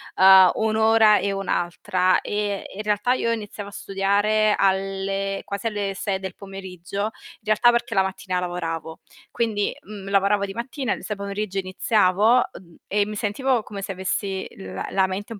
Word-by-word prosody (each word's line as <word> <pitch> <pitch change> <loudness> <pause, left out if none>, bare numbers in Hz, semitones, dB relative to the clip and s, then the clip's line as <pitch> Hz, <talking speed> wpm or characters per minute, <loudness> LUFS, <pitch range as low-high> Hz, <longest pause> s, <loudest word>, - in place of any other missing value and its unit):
uhm, 190 -1 +8
un'ora 220 -1 +4
e 200 - -1
un'altra, 185 -1 0
e 205 -1 -2
in 210 - -4
realtà 210 +3 +1
io 230 -2 0
iniziavo 205 -2 -5
a - - -14
studiare 205 +2 +1
alle 195 0 0
quasi 200 +2 -3
alle 205 -3 -2
6 195 0 -2
del 190 -1 -6
pomeriggio, 195 -1 -6
in 215 - -1 0.3
realtà 215 +3 +4
perché 235 -1 -1
la 195 - +4
mattina 190 -1 -3
lavoravo. 165 -2 -4 0.3
Quindi, 215 -3 0
mhmm, 200 -1 -9
lavoravo 200 +1 +2
di 195 - -7
mattina, 250 +1 -3
il - - -8
s 215 - -3
pomeriggio 200 0 -3
iniziavo, 195 +3 +3 0.2
uhm, 170 -3 -14
e 205 0 +1
mi 210 +1 -6
sentivo 235 +4 0
come 205 -2 -7
se 195 - -4
avessi 190 +1 -3
la 95 0 -6
la 190 -1 +2
mente 200 +4 -5
un 210 - -10
200 Hz, 170 wpm, -23 LUFS, 190-210 Hz, 0.3 s, uhm